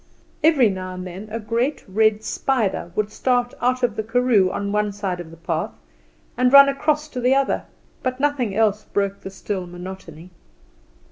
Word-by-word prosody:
Every 300 -7 +5
now 185 -2 -4
and 185 0 -6
then 185 +4 -8
a 225 +2 -4
great 235 +6 -1
red 215 +2 +2
spider 220 -11 -1
would 215 0 -1
start 245 0 0
out 255 +1 +1
of 245 - +1
the - - -1
karoo 225 -3 +2
on 200 +2 -3
one 210 0 0
side 195 -3 -3
of 170 -2 -8
the 165 - -13
path 165 - -3 0.6
and 250 0 +2
run 280 0 +10
across 300 +2 0
to 250 - -5
the 250 +2 +3
other, 275 0 0 0.4
but 255 0 -2
nothing 270 -8 0
else 215 -1 +2
broke 200 0 -2
the - - -7
still 190 -1 -5
monotony. 175 -1 -10
215 Hz, 180 wpm, -22 LUFS, 190-250 Hz, 0.6 s, run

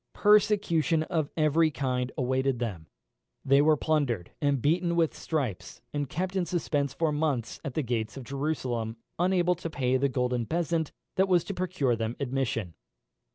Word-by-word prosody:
Persecution 195 -6 +3
of 160 -3 -1
every 155 +1 +4
kind 130 -3 -2
awaited 130 0 +1
them. 100 -10 -4 0.6
They 140 +1 +5
were 155 +1 +4
plundered, 140 - 0
and 145 -2 +2
beaten 170 +6 +1
with 165 -2 +2
stripes, 135 - -3
and 145 -2 -2
kept 185 +5 -3
in 180 -2 0
suspense 145 -5 0
for 160 +1 0
months 145 -6 -1
at 140 - -5
the 155 - 0
gates 115 -1 -2
of 135 - -6
Jerusalem, 125 -5 -2 0.2
unable 180 0 +3
to 170 -1 -6
pay 130 -4 +1
the 140 +2 +1
golden 125 -2 0
bezant 165 +1 -1 0.3
that 190 +1 +4
was 180 -3 +3
to 200 - -5
procure 180 -9 0
them 115 +1 -3
admission. 125 - -2
145 Hz, 160 wpm, -28 LUFS, 125-165 Hz, 0.6 s, They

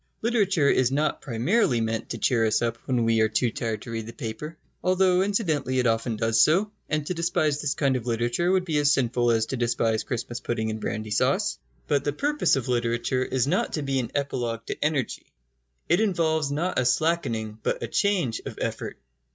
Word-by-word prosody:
Literature 200 -10 +2
is 130 -2 +3
not 150 +3 0
primarily 125 - +1
meant 110 0 -2
to - - -4
cheer 120 -4 +2
us 110 - +1
up 115 -1 0
when 125 -3 +1
we 115 -1 +3
are 110 - +3
too 115 +2 +1
tired 110 -2 -3
to 115 - -8
read 115 -1 -4
the 115 - -8
paper, 150 +6 -6 0.3
though 185 0 +3
incidentally 160 - 0
it 125 - +2
often 115 0 +1
does 115 +1 +2
so, 190 +7 +3 0.2
and 155 -1 -1
to 180 - -2
despise 155 -4 0
this 145 -1 -1
kind 135 -2 +1
of 125 -1 -4
literature 120 +9 0
would 190 -1 +2
be 155 -4 0
as 145 0 +4
sinful 120 -3 +1
as 115 -1 +2
to 130 +4 -4
despise 115 -2 +1
Christmas 120 0 -4
pudding 110 -3 -2
and 110 0 -5
brandy 110 -1 -4
sauce. 105 - +1 0.3
But 145 -2 +1
the 145 - -1
purpose 295 - +1
of 135 -3 -3
literature 120 +1 0
is 130 -1 0
not 175 +7 0
to 150 - -2
be 135 -1 0
an 120 -3 -3
epilogue 120 -5 -2
to - - -4
energy. 150 -5 -1 0.6
It 175 - +3
involves 160 -7 +1
not 170 +6 0
a - - +1
slackening, 125 -7 0
but - - -2
a - - -2
change, 185 - 0
of - - -7
effort. - - -4
130 Hz, 205 wpm, -25 LUFS, 115-155 Hz, 0.6 s, as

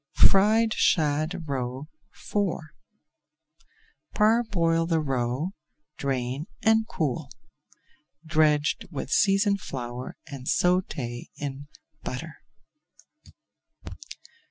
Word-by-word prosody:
FRIED 215 +3 +5
SHAD 155 +3 +1
ROE 130 +1 -3 0.2
IV 180 -6 -2 1.4
Parboil 205 -7 +3
the 165 -1 +2
roe, 135 +3 -1 0.4
drain, 135 +2 -2 0.2
and 220 0 +4
cool. 150 -4 -2 1.0
Dredge 155 -2 +3
with 145 -4 -5
seasoned 200 0 +3
flour 125 -1 -6
and 135 -2 -9
sauté 145 -10 0
in 140 0 -5 0.3
butter. 155 +4 -6
155 Hz, 75 wpm, -26 LUFS, 135-185 Hz, 1.4 s, FRIED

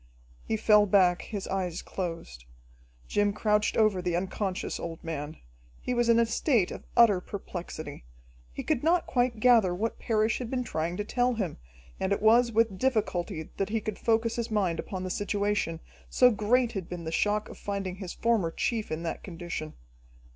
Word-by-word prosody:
He 220 - -1
fell 210 -1 +5
back, 180 -3 +4
his 205 -4 -5
eyes 185 -3 -2
closed. 165 - -6 0.6
Jim 205 0 +1
crouched 210 0 +1
over 215 -4 +3
the 180 -1 -1
unconscious 190 +1 -2
old 165 -1 -6
man. 155 -2 -5 0.4
He 250 - -3
was 240 -1 +1
in 230 - +6
a 235 - +4
state 230 - +1
of - - -7
utter 210 -6 +6
perplexity. 175 - -7 0.5
He - - -6
could - - 0
not 335 +2 +3
quite 245 -2 0
gather 220 -7 +5
what 225 +5 -2
Parrish 220 -1 +1
had 245 -3 -5
been 250 -1 -1
trying 170 -4 -3
to 210 - -1
tell 245 +3 +1
him, 195 -7 -3 0.4
and 190 - -1
it 200 - +1
was 235 +2 +5
with 220 -4 +1
difficulty 195 -9 -1
that 195 0 -1
he 225 +1 0
could 215 -1 -5
focus 230 0 +1
his 235 0 -2
mind 190 -6 0
upon 185 -2 -4
the 185 - -3
situation, 205 -5 -1 0.3
so 250 -1 +5
great 235 +3 +2
had 195 -6 -5
been 175 -1 -6
the 160 - -4
shock 210 +4 +1
of - - -11
finding 195 -2 -4
his 190 -3 -6
former 225 -7 +1
chief 220 +5 -2
in 155 +2 -3
that 165 - -4
condition. 170 -3 -6
205 Hz, 185 wpm, -28 LUFS, 180-230 Hz, 0.6 s, in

